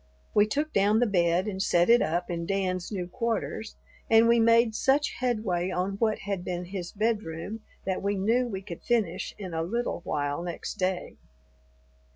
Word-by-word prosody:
We 210 0 +5
took 295 +7 -1
down 205 +2 +3
the 245 - +4
bed 180 -2 +2
and 190 -2 -3
set 175 -3 +3
it 240 +1 +6
up 175 +2 -1
in 170 -1 -3
Dan's 185 -2 -1
new 185 -4 -2
quarters, 225 +2 -3 0.3
and 225 +1 +6
we 235 0 +5
made 230 0 +5
such 275 +6 +2
headway 215 -8 0
on 185 +2 -2
what 220 0 +1
had 200 -3 -2
been 180 0 -3
his 180 -1 -6
bedroom 210 -2 -2 0.3
that 190 -1 -1
we 200 +1 0
knew 230 +6 +2
we 195 -4 -5
could 175 -4 -8
finish 210 -7 -1
in 185 -4 -7
a 160 - -1
little 230 +4 -2
while 145 +1 -2
next 175 -1 -5
day. 185 -1 -2
195 Hz, 180 wpm, -28 LUFS, 180-225 Hz, 0.3 s, it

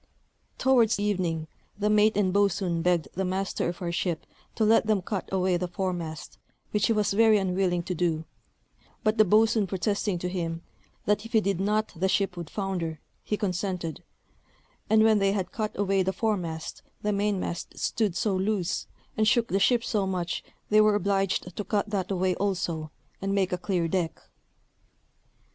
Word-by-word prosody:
Towards 240 -5 +3
evening 180 -6 -1 0.3
the 205 0 0
mate 210 0 +4
and 190 -3 +2
boatswain 195 -4 +1
begged 170 -3 +1
the 190 - -2
master 190 -1 -1
of 175 +1 -6
our 170 - -1
ship 170 -1 -2 0.3
to 220 - +1
let 220 0 +4
them 210 -4 +2
cut 195 -1 -4
away 185 -1 +2
the 180 +1 -2
foremast, 175 -3 -4 0.3
which 210 -1 +2
he - - +1
was 210 -2 +1
very 220 +1 +5
unwilling 185 -2 0
to 180 - -3
do; 165 -2 0 0.8
but 215 +1 +1
the - - +9
boatswain 215 +1 +4
protesting 200 +1 -1
to 180 - -3
him, 170 -2 -3 0.4
that 210 0 +1
if 225 - -11
he 220 - +6
did 200 -3 -1
not 210 +2 0
the 190 +3 0
ship 195 -1 +1
would 170 -3 -6
founder, 180 -6 -3 0.2
he 210 - -1
consented; 180 -5 -2 0.9
and 220 0 +5
when 220 -1 +5
they 195 0 +2
had 195 -3 -2
cut 220 -6 -3
away 195 -1 +2
the 190 +1 +1
foremast, 175 -8 -2 0.2
the 210 0 +1
mainmast 200 -4 -2
stood 210 -6 0
so 195 +3 +1
loose, 190 -1 -1 0.3
and 215 0 +2
shook 230 +1 +3
the 195 - +1
ship 235 +3 +3
so 205 -5 0
much, 180 -2 -2 0.3
they 215 0 +7
were 215 -1 +4
obliged 195 -2 0
to 210 - -3
cut 205 +1 -1
that 190 -3 -1
away 185 -1 +1
also, 175 -5 -1 0.3
and 195 0 -1
make 190 -2 +1
a - - +3
clear 175 -2 0
deck. 170 -1 -1
195 Hz, 175 wpm, -27 LUFS, 180-210 Hz, 0.9 s, the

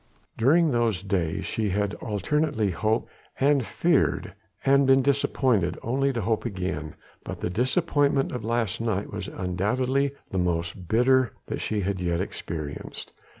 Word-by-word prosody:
During 155 +7 +4
those 115 -6 +1
days 90 -5 -1
she 110 -2 -1
had 100 +1 0
alternately 115 +1 0
hoped 110 +6 0 0.3
and 140 -1 +4
feared 165 - +1 0.3
and 140 0 +5
been 135 0 +5
disappointed 125 - +1
only 135 +4 +1
to 120 -3 -2
hope 110 +2 0
again: 90 - -4 0.3
but - - -6
the 90 - -2
disappointment 140 - +1
of 125 -3 -4
last 115 -2 -1
night 105 -4 -2
was 100 -1 -4
undoubtedly 125 +10 0 0.2
the 95 - 0
most 85 0 -2
bitter 125 +3 +3
that - - -4
she 105 -1 -1
had 95 -1 -2
yet 85 -1 0
experienced. 75 -3 -5
110 Hz, 145 wpm, -26 LUFS, 95-135 Hz, 0.3 s, and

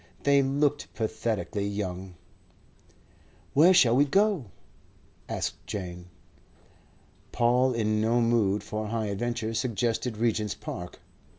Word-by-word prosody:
They 140 0 +5
looked 145 +2 0
pathetically 110 -2 -2
young. 95 -2 -4 1.4
"Where 160 +6 +6
shall 120 -10 +5
we 140 - +5
go?" 195 - +2 0.8
asked - - -3
Jane. 90 -3 -6 1.2
Paul, 125 +2 +3
in 110 -2 0
no 115 +2 +2
mood 115 -4 +2
for 110 0 -4
high 110 0 -2
adventure, 115 +2 -2
suggested 115 0 -1
Regent's 110 -2 0
Park. 90 0 -8
115 Hz, 105 wpm, -27 LUFS, 105-125 Hz, 1.4 s, Where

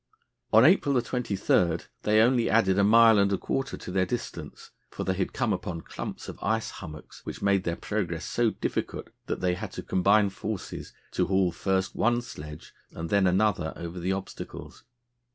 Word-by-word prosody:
On 110 +3 +7
April 145 -6 +4
23 100 -8 +1 0.2
they 105 +1 +3
only 120 -1 +3
added 95 -2 +3
a - - +5
mile 115 +1 +7
and 100 0 +3
a 100 - +2
quarter 135 +6 -3
to - - -8
their 95 0 +1
distance, 85 -10 -6 0.2
for - - -5
they 95 - 0
had 95 0 -2
come - - 0
upon 85 -2 -4
clumps - - -7
of - - -8
ice 110 +2 0
hummocks 75 -5 -10
which - - -7
made 100 -2 +2
their 85 - 0
progress 85 -6 -3
so 120 -1 +1
difficult - - -4 0.2
that - - -3
they 90 -1 +2
had 100 +2 -5
to - - -6
combine 100 +2 +3
forces 105 0 -6 0.2
to - - 0
haul 95 -2 +2
first 95 +1 -1
one 120 +1 +2
sledge 75 -9 -10 0.2
and 80 0 -7
then 100 -2 +4
another 95 -3 +1
over 85 +1 -6
the 90 +2 -1
obstacles. 95 0 -7
100 Hz, 180 wpm, -27 LUFS, 90-110 Hz, 0.2 s, On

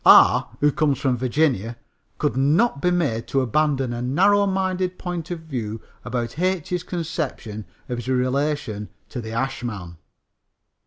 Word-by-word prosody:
R., - - +7
who 150 0 +5
comes 145 -2 +2
from 135 -3 +2
Virginia, 125 -3 +1 0.4
could 115 - 0
not 145 - +3
be 180 - +3
made 150 -11 0
to 135 - +1
abandon 135 0 +1
a 120 - -3
narrow 195 +11 +4
minded 185 -1 0
point 175 -2 -4
of 175 -2 -4
view 115 -8 -4 0.2
about 120 +3 -3
H.'s 180 -1 0
conception 155 - -4 0.2
of 120 -1 -3
his 120 - -7
relation 130 -4 0 0.2
to 125 - -5
the 110 -1 -6
ashman. 115 -8 -3
140 Hz, 145 wpm, -23 LUFS, 120-170 Hz, 0.4 s, R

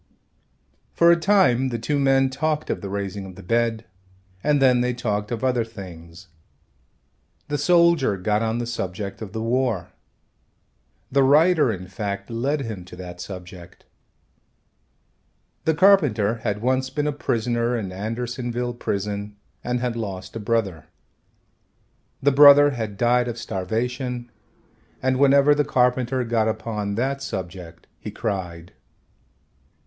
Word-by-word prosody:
For 170 0 +5
a - - +6
time 170 -9 +3
the 120 - -3
two 140 +6 -1
men 135 -1 +3
talked 155 +2 -1
of - - -3
the 100 - -6
raising 100 0 -4
of 95 - -11
the 95 - -12
bed 115 +2 0 0.6
and 150 -1 +3
then 125 -2 +4
they 125 0 0
talked 105 -4 -2
of 115 0 -3
other 125 -2 +2
things. 90 -4 -11 1.2
The 145 - -1
soldier 170 - +3
got 105 +3 0
on 115 0 -1
the 120 - -2
subject 100 -3 -5
of 105 -4 -7
the 110 +1 -4
war. 115 -7 0 1.2
The 140 +1 +3
writer, 150 0 +4
in 90 -3 -6
fact, 100 +2 -5
led 135 +6 -1
him 110 -7 -6
to 90 - -12
that 90 -1 -9
subject. 90 -1 -10 1.8
The 160 - +2
carpenter 145 - +4
had 105 -1 -3
once 130 +1 +1
been 150 +2 -2
a 150 - +1
prisoner 120 -2 -1
in 100 -5 -4
Andersonville 120 +4 -3
prison 100 -2 -4 0.3
and 125 0 -2
had 125 -2 -2
lost 95 -4 -6
a - - -3
brother. 105 -6 -2 1.4
The 145 - +4
brother 145 +1 +8
had 110 -6 -5
died 120 +2 +2
of 120 -1 -4
starvation, 120 +4 -3 0.7
and 130 0 0
whenever 140 +1 +5
the 145 0 +1
carpenter 125 0 +1
got 115 -2 0
upon 110 -2 -3
that 135 +4 -1
subject 90 -7 -7
he - - -7
cried. 90 -6 -5
115 Hz, 140 wpm, -23 LUFS, 100-130 Hz, 1.8 s, brother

